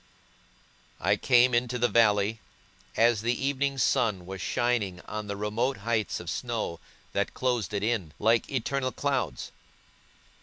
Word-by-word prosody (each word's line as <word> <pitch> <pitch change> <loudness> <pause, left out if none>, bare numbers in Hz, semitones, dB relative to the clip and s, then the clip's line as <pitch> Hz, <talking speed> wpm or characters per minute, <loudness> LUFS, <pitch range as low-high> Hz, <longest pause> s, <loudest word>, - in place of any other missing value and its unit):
I 100 +4 +2
came 125 +2 +4
into 120 +1 +1
the 120 0 +3
valley, 105 -1 +3 0.6
as 115 -2 +4
the 120 +2 0
evening 140 0 0
sun 115 -8 +1
was 95 0 -7
shining 110 -5 0
on 105 0 -6
the 100 - -3
remote 110 +6 -1
heights 110 -1 -1
of - - -10
snow, 85 - -3 0.3
that - - -1
closed 125 -7 0
it 100 -1 -2
in, 110 -8 -1
like 115 +2 +2
eternal 130 0 -1
clouds. 125 - -2
115 Hz, 140 wpm, -28 LUFS, 100-125 Hz, 0.6 s, came